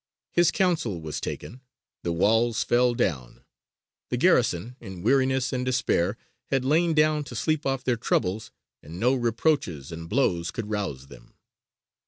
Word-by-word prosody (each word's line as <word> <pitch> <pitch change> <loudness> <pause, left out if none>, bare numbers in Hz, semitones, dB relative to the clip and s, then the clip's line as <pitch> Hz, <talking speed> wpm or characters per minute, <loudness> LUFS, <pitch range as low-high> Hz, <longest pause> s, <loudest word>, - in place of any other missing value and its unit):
His 175 -1 +4
counsel 160 - 0
was 80 -2 -5
taken; 125 - -6 0.4
the 85 - -2
walls 110 +6 +2
fell 120 0 +2
down; 70 - -2 0.7
the - - -1
garrison, 105 +9 +2
in 95 -5 -9
weariness 130 +1 +2
and 125 0 -1
despair, 115 -6 0 0.3
had 135 -2 0
lain 160 +3 +2
down 155 -1 +3
to 125 - -9
sleep 155 +5 0
off 135 -1 -1
their 125 -2 +1
troubles, 110 -2 -1 0.3
and 80 +4 -10
no 125 +5 +3
reproaches 115 - 0
and 80 0 -7
blows 90 -8 +1
could 105 +2 -5
rouse 95 -11 -3
them. - - -16
120 Hz, 150 wpm, -26 LUFS, 90-135 Hz, 0.7 s, His